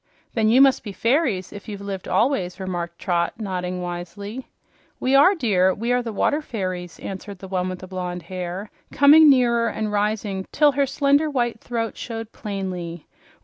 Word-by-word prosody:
"Then 220 -2 +2
you 250 +4 +6
must 270 -1 +5
be 205 - -6
fairies 230 - 0
if 205 +1 -9
you've 205 -2 -6
lived 200 -2 -6
always," 210 -8 0
remarked 175 -2 -4
Trot, 170 -3 -1
nodding 180 -4 -3
wisely. 180 +7 -6 0.5
"We 260 - 0
are, 290 +9 +6
dear. 190 - +2
We 235 +3 -2
are 245 0 +2
the 235 -2 -5
water 290 +8 +1
fairies," 185 - -5
answered 195 +1 -7
the 190 - -10
one 185 -1 -1
with 185 - -5
the 185 - -8
blonde 180 -2 -5
hair, 185 +3 -6 0.2
coming 300 +2 +7
nearer 240 -3 +4
and 215 -1 -2
rising 205 -2 -1
till 295 -1 +4
her 280 0 +1
slender 285 +3 +2
white 240 -5 -1
throat 230 -2 -3
showed 225 -1 -6
plainly. 185 -6 -5
205 Hz, 175 wpm, -23 LUFS, 185-245 Hz, 0.5 s, coming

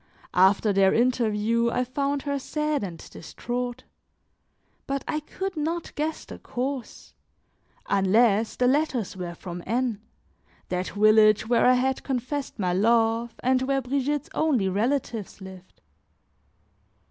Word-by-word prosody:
After 195 +3 +4
their 195 0 +4
interview, 235 -1 +1
I 250 - 0
found 275 +2 -2
her 280 -1 -2
sad 300 -1 -2
and 175 -4 -5
distraught; 245 +7 -5 1.0
but 275 0 -2
I 310 - -1
could 380 +5 -5
not 325 +2 -3
guess 310 +1 -3
the - - -10
cause, 260 0 -5 0.7
unless 210 +2 +2
the 250 - +1
letters 260 -6 +1
were 175 -2 -6
from 175 0 -7
N, 235 -1 -1 0.7
that 180 0 -2
village 215 0 +4
where 240 +1 +3
I 255 - +6
had 260 +1 0
confessed 270 +2 -3
my 180 -4 0
love 225 +3 +2
and 255 0 +2
where 270 +1 +1
Brigitte's 280 +3 -2
only 265 -11 +1
relatives 225 +1 -2
lived. 190 -1 -13
240 Hz, 125 wpm, -25 LUFS, 210-275 Hz, 1.0 s, I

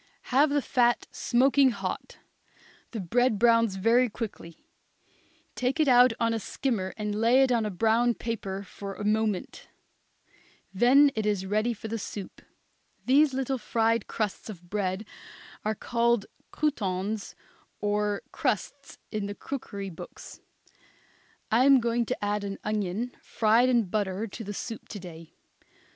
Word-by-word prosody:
Have 285 +4 +5
the 290 -1 +1
fat 240 -2 +2
smoking 265 +2 +3
hot; 195 -5 -5 0.7
the 225 - -5
bread 225 +5 +1
browns 230 -2 +4
very 230 +6 +3
quickly; 205 -7 -7 0.9
take 255 +5 -1
it 310 - +3
out 250 -1 +7
on 230 0 +1
a 225 - -1
skimmer 215 -4 -2
and 210 -1 -2
lay 230 +5 +4
it 265 - +2
on 230 -3 +2
a - - -2
brown 225 +5 +2
paper 200 -4 -4
for 195 0 -8
a - - -6
moment; 215 -2 -1 1.1
then 270 +8 +6
it 215 -1 -2
is 200 -2 0
ready 215 +4 +1
for 220 -1 -6
the 225 +1 -3
soup. 200 -1 -7 0.6
These 275 +1 +4
little 265 0 -1
fried 225 0 +1
crusts 215 0 -3
of 175 -4 -11
bread 195 0 -2 0.6
are 215 +1 -1
called 235 -1 +1 0.2
croutons 205 -7 -2 0.4
or 205 0 0
crusts - - -3
in 210 -2 -2
the 205 - -6
cookery 200 -8 -6
books. 165 - -11 1.1
I 235 +4 +4
am 275 -1 +7
going 235 -1 0
to - - -2
add 205 0 -1
an 195 -1 -4
onion 215 +3 -2
fried 230 +3 +3
in 240 -3 +3
butter 195 +1 -2
to 225 +2 -8
the 205 0 -6
soup 225 +2 -6
to 205 - -6
day. 165 -3 -11
220 Hz, 145 wpm, -27 LUFS, 200-245 Hz, 1.1 s, out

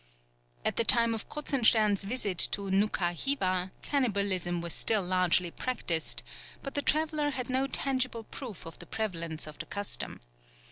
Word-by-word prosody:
At - - 0
the - - +3
time 230 0 +5
of 225 - -6
Kruzenstern's 225 -8 +2
visit 200 -4 -1
to 200 -1 -3
Noukha 190 -3 +1
Hiva, 185 - -1
cannibalism 200 -9 +1
was 170 -1 -3
still 215 -3 +4
largely 180 -1 +2
practised, 165 - -1 0.4
but 275 - -6
the 285 - +1
traveller 305 0 +1
had 255 -3 -4
no 265 +1 +1
tangible 255 -4 -1
proof 220 -5 -9
of 165 - -9
the - - -12
prevalence 170 -7 -3
of 155 -1 -11
the - - -6
custom. 205 0 -3
210 Hz, 150 wpm, -29 LUFS, 180-255 Hz, 0.4 s, time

